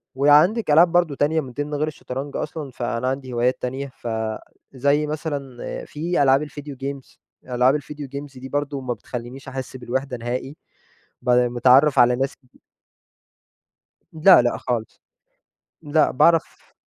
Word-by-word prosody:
وعندِك 150 - +4
ألعاب 170 +3 +6
برضه 175 -4 +2
تانية 155 +3 +1
من 130 -3 -9
ضمن 145 +4 -4
غير 150 +1 0
الشطرنج 140 -2 -6
أصلًا، 150 -3 -5
فأنا 120 0 -3
عندي 130 -1 -3
هوايات 120 +2 0
تانية 135 +2 -3
ف 130 -2 -11 0.7
زي 140 +3 +1
مثلًا 145 -4 -5 0.3
في 165 +1 -1
ألعاب 135 +2 +4
الVideo 145 0 -8
games، 140 -1 -6 0.3
ألعاب 125 +4 +3
الVideo 145 0 -8
games 140 -2 -7
دي 130 +1 -8
برضه 145 -1 -2
ما 125 -1 -2
بتخلّينش 120 +4 -8
أحس 130 -1 -6
بالوِحدة 130 +1 -3
نهائي، 125 +4 -4 0.7
ب 125 - -4
مِتعرَّف 125 +3 +4
على 125 0 +6
ناس 135 +2 -1 1.8
لأ، 165 -1 +6
لأ 120 - 0
خالص، 115 -3 -4 0.8
لأ 150 0 +2
باعرف 165 +5 +1
135 Hz, 140 wpm, -22 LUFS, 125-150 Hz, 1.8 s, ألعاب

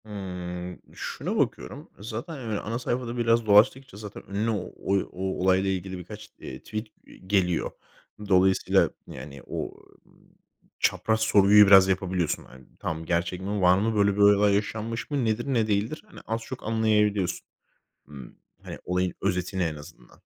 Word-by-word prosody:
Hımm. 90 -3 -6
Şuna - - -4
bakıyorum. 60 - -2
E, - - -11
zaten 115 +9 -5
hani, 115 -7 -3
ana 115 +2 -4
sayfada 120 -1 -3
biraz 115 -1 +2
dolaştıkça, 110 +3 +4
zaten 105 -1 -9
önüne 105 +3 -1
o 105 -5 -3 0.4
o 90 - -9 0.2
olayla 95 +1 +3
ilgili 95 0 -3
birkaç, 90 - -10
eee, - - -8
tweet, 110 +1 -6 0.2
eee, - - -16
geliyor. 95 -3 0 0.6
Dolayısıyla, 95 0 +4 0.2
yani, 70 -2 -9
o, - - -3 0.4
ııı, - - -25 0.6
çapraz 110 0 +1
sorguyu 105 -1 +6
biraz 95 -1 +8
yapabiliyorsun. 95 -3 -1
Hani, 65 0 -16
tamam, 80 0 -4
gerçek 85 +2 -1
mi? 100 +1 -2
Var 90 0 +5
mı? 110 +3 0
Böyle 100 -1 +2
böyle 100 0 +5
yaşanmış 110 +2 -3
mı? 140 -4 0
Nedir? 110 +2 0
Ne 115 -3 +2
değildir? 110 +9 -1
Hani - - -13
az 115 +1 -2
çok 125 +3 -8
anlayabiliyorsun. 105 -3 +1 0.6
Imm, 70 -3 -11 0.3
hani - - -7
olayın 90 0 0
özetini 90 -1 -1
en 80 -2 -2
azından. 75 -4 -14
100 Hz, 155 wpm, -26 LUFS, 90-110 Hz, 0.6 s, biraz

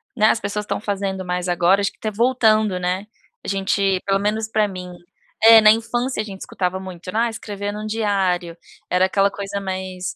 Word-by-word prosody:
né, 215 -3 +4
as 220 - +3
pessoas 205 +1 -3
estão - - -2
fazendo 195 -2 -3
mais 180 0 -2
agora, 175 +3 +3
acho 200 - 0
que - - -31
tá 215 - -3
voltando, 220 -3 +2
né, 180 +3 -2 0.4
a - - -9
gente, 195 -1 +1
pelo 195 0 +1
menos 215 +2 -1
para 215 -1 +1
mim 180 -2 -8 0.5
é 225 0 +10
na 215 - +8
infância 240 +2 -1
a - - -3
gente 195 -2 -9
escutava 185 0 -3
muito, 185 -1 -8
né: 220 - 0
"Ah, 235 - +1
escrever 205 -2 -5
num 215 +1 -5
diário", 195 -6 -1 0.3
era 180 +1 +3
aquela 195 +1 +2
coisa 200 0 -5
mais, 185 -1 -5
200 Hz, 200 wpm, -21 LUFS, 185-215 Hz, 0.5 s, é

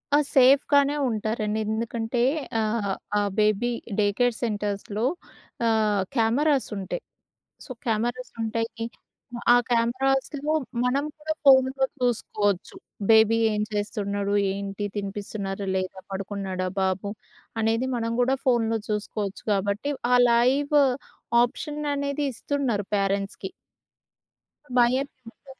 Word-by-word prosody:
ఆ! - - +7 0.2
సేఫ్‌గానే 280 +2 +5
ఉంటారండి. 215 -1 -1
ఎందుకంటే 230 +2 -2 0.4
ఆహ్, 215 -2 0 0.2
ఆ - - +4 0.2
బేబీ 215 +3 +2 0.3
డే 210 - +4
కేర్ 245 -1 +3
సెంటర్స్‌లో 210 -1 -2 0.6
ఆహ్, 215 -3 +2
కెమెరాస్ 265 +5 +2
ఉంటాయి. 195 - -4 0.6
సో, - - -17 0.2
కెమెరాస్ 240 +3 -1
ఉంటాయి. 230 +1 -2 0.7
ఆ - - +8 0.2
కెమెరాస్‌లో 270 +5 +1 0.3
మనం 270 +3 +1
కూడా 310 +1 -2
ఫోన్‌లో 265 0 +5
చూసుకోవచ్చు. 210 -5 0 0.3
బేబీ 220 0 +6
ఏం 210 0 0
చేస్తున్నాడు 205 -1 -2 0.2
ఏంటి 200 +1 -4
తినిపిస్తున్నారా 200 0 -4
లేదా? 185 0 -3
పడుకున్నాడా 190 -1 -3
బాబు 190 +1 -1 0.5
అనేది 225 +3 +1
మనం 230 -1 -2
కూడా 260 +2 +2
ఫోన్‌లో 225 -3 +2
చూసుకోవచ్చు 210 -1 -3
కాబట్టి 200 +8 0 0.2
ఆ - - +7 0.2
లైవ్ 265 +5 +3 0.7
ఆప్షన్ 295 +5 -3
అనేది 280 +1 -2
ఇస్తున్నారు 245 -4 -1
ప్యారెంట్స్‌కి. 200 - -1 1.3
భయం 245 +1 +5
ఎం 275 - -4 0.2
ఉండదు. 240 - -25
225 Hz, 105 wpm, -25 LUFS, 205-255 Hz, 1.3 s, ఆ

